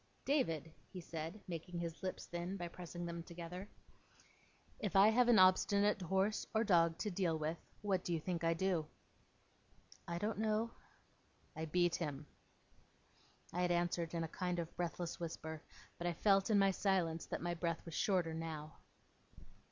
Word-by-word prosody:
'David,' 165 Hz, -, +1 dB, 0.2 s
he 185 Hz, -, -6 dB
said, 165 Hz, +3 st, -5 dB
making 175 Hz, 0 st, -5 dB
his 170 Hz, -1 st, -4 dB
lips 185 Hz, -1 st, -4 dB
thin, 175 Hz, +3 st, -4 dB
by 175 Hz, -2 st, -3 dB
pressing 175 Hz, 0 st, -7 dB
them 170 Hz, 0 st, -4 dB
together, 175 Hz, +3 st, -7 dB, 1.1 s
'if 205 Hz, -4 st, -2 dB
I 195 Hz, +2 st, +8 dB
have 240 Hz, +2 st, +4 dB
an 240 Hz, -2 st, +7 dB
obstinate 200 Hz, +2 st, +5 dB
horse 190 Hz, +4 st, +1 dB
or 220 Hz, -, +4 dB
dog 170 Hz, -5 st, +4 dB
to 210 Hz, -, -2 dB
deal 175 Hz, -3 st, +1 dB
with, 155 Hz, +2 st, -2 dB, 0.2 s
what 190 Hz, -3 st, +1 dB
do -, -, -3 dB
you 165 Hz, -, +1 dB
think 170 Hz, +1 st, -3 dB
I 165 Hz, 0 st, +3 dB
do?' 175 Hz, -3 st, +1 dB, 1.2 s
'I 170 Hz, 0 st, -2 dB
don't 210 Hz, +4 st, -1 dB
know.' 220 Hz, +1 st, +1 dB, 0.8 s
'I 160 Hz, -, -3 dB
beat 175 Hz, +2 st, +2 dB
him.' 150 Hz, -3 st, -4 dB, 1.3 s
I 180 Hz, -, 0 dB
had 180 Hz, -, +2 dB
answered 175 Hz, -1 st, 0 dB
in 165 Hz, -, 0 dB
a -, -, -2 dB
kind 180 Hz, +2 st, -2 dB
of 170 Hz, -1 st, -4 dB
breathless 175 Hz, -1 st, -3 dB
whisper, 160 Hz, -2 st, -5 dB, 0.4 s
but 175 Hz, -, -1 dB
I 175 Hz, -, +1 dB
felt, 195 Hz, +3 st, +3 dB
in 215 Hz, -, +5 dB
my 195 Hz, -1 st, +5 dB
silence, 180 Hz, -4 st, +1 dB
that -, -, -4 dB
my 175 Hz, 0 st, 0 dB
breath 165 Hz, -1 st, -2 dB
was 165 Hz, -, -7 dB
shorter 175 Hz, -2 st, +1 dB
now. 160 Hz, -1 st, -5 dB
175 Hz, 165 wpm, -38 LUFS, 165-195 Hz, 1.3 s, I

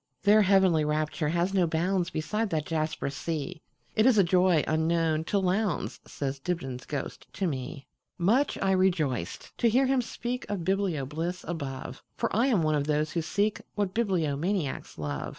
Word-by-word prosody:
Their 210 Hz, +2 st, +6 dB
heavenly 190 Hz, -5 st, +4 dB
rapture 150 Hz, +1 st, 0 dB
has 175 Hz, +4 st, 0 dB
no 185 Hz, -3 st, +3 dB
boundsBeside 175 Hz, +4 st, 0 dB
that 155 Hz, -3 st, -1 dB
jasper 155 Hz, -3 st, -2 dB
sea; 150 Hz, +2 st, -4 dB, 0.3 s
It 220 Hz, +3 st, +4 dB
is 250 Hz, -4 st, +5 dB
a 200 Hz, -, +7 dB
joy 180 Hz, -2 st, +3 dB
unknown 160 Hz, 0 st, +1 dB
to 205 Hz, -, 0 dB
Lowndes,"Says 180 Hz, -7 st, -1 dB
Dibdin's 135 Hz, -6 st, -4 dB
ghost 145 Hz, -2 st, -5 dB
to 190 Hz, -, -2 dB
me. 135 Hz, -3 st, -4 dB, 0.3 s
Much 225 Hz, +11 st, +2 dB
I 195 Hz, -, +3 dB
rejoiced 170 Hz, -, 0 dB
to 235 Hz, -, +4 dB
hear 255 Hz, +4 st, +3 dB
him 265 Hz, -1 st, +2 dB
speakOf 235 Hz, -6 st, -4 dB
biblio 185 Hz, -7 st, 0 dB
bliss 170 Hz, +5 st, -4 dB
above, 135 Hz, -6 st, -5 dB, 0.2 s
For -, -, -1 dB
I 235 Hz, +5 st, +3 dB
am 215 Hz, -11 st, +3 dB
one 155 Hz, 0 st, +2 dB
of 145 Hz, -1 st, 0 dB
those 150 Hz, 0 st, +1 dB
who 170 Hz, -, -1 dB
seekWhat 205 Hz, +2 st, -1 dB
bibliomaniacs 175 Hz, -, -1 dB
love. 75 Hz, -2 st, -3 dB
170 Hz, 155 wpm, -28 LUFS, 150-195 Hz, 0.3 s, a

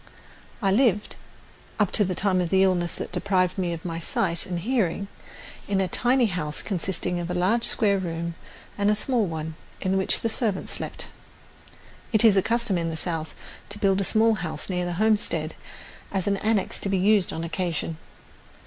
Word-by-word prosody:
I 195 Hz, -, +3 dB
lived, 210 Hz, -2 st, +2 dB, 0.6 s
up 210 Hz, -3 st, +2 dB
to 210 Hz, -, +5 dB
the 185 Hz, -2 st, -1 dB
time 190 Hz, -1 st, +2 dB
of 175 Hz, -, -1 dB
the 190 Hz, +1 st, +4 dB
illness 175 Hz, -2 st, +1 dB
that -, -, -6 dB
deprived 185 Hz, -2 st, +1 dB
me 180 Hz, -2 st, 0 dB
of 165 Hz, 0 st, -6 dB
my 165 Hz, -1 st, -3 dB
sight 170 Hz, +2 st, 0 dB
and 180 Hz, -2 st, -3 dB
hearing, 200 Hz, -3 st, 0 dB, 0.6 s
in 200 Hz, -1 st, +1 dB
a 190 Hz, -, +2 dB
tiny 245 Hz, +7 st, +2 dB
house 170 Hz, -7 st, -3 dB
consisting 180 Hz, -2 st, -2 dB
of 175 Hz, 0 st, -4 dB
a 180 Hz, -, -2 dB
large 200 Hz, +7 st, +2 dB
square 200 Hz, -3 st, +3 dB
room 170 Hz, -1 st, -3 dB, 0.5 s
and 200 Hz, 0 st, +3 dB
a 210 Hz, -, +4 dB
small 230 Hz, -1 st, +1 dB
one, 160 Hz, -1 st, -4 dB, 0.3 s
in 190 Hz, +1 st, 0 dB
which 190 Hz, -, +2 dB
the -, -, +1 dB
servant 220 Hz, -4 st, -1 dB
slept. -, -, -5 dB, 1.1 s
It 220 Hz, -1 st, +4 dB
is 215 Hz, -3 st, +7 dB
a 195 Hz, -, +5 dB
custom 230 Hz, -4 st, 0 dB
in 165 Hz, 0 st, -1 dB
the 160 Hz, -, -4 dB
South 160 Hz, -2 st, -3 dB, 0.3 s
to -, -, -6 dB
build 195 Hz, -1 st, +2 dB
a -, -, +1 dB
small 220 Hz, +3 st, +3 dB
house 165 Hz, -3 st, -3 dB
near 180 Hz, -1 st, -1 dB
the 175 Hz, -, -2 dB
homestead 215 Hz, +3 st, +1 dB, 0.6 s
as 190 Hz, -2 st, -1 dB
an 200 Hz, -1 st, +1 dB
annex 215 Hz, -1 st, 0 dB
to 195 Hz, -, -3 dB
be 195 Hz, -, +2 dB
used 200 Hz, +1 st, +3 dB
on 165 Hz, -, -4 dB
occasion. 165 Hz, -1 st, -3 dB
190 Hz, 190 wpm, -25 LUFS, 175-210 Hz, 1.1 s, is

